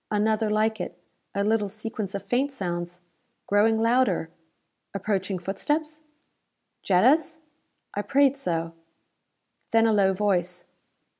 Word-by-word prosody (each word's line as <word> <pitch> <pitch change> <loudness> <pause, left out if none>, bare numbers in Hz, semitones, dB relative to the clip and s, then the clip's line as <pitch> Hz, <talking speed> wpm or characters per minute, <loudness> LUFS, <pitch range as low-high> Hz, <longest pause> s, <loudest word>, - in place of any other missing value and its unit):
Another 215 +1 +1
like 220 +1 +1
it; 175 - -6 0.4
a 200 - +1
little 210 -1 +1
sequence 215 -1 -4
of 200 - -4
faint 270 +4 0
sounds. 175 -6 -4 0.4
Growing 220 +2 +3
louder. 230 -8 +2 0.6
Approaching 195 -1 -1
footsteps? 300 - -2 0.8
Jetta's? 285 - +3 0.6
I 205 - -1
prayed 280 +3 +3
so. 165 -10 -3 1.0
Then 225 0 +4
a 225 - +3
low 195 -2 +4
voice. 180 -3 0
210 Hz, 115 wpm, -26 LUFS, 190-230 Hz, 1.0 s, Then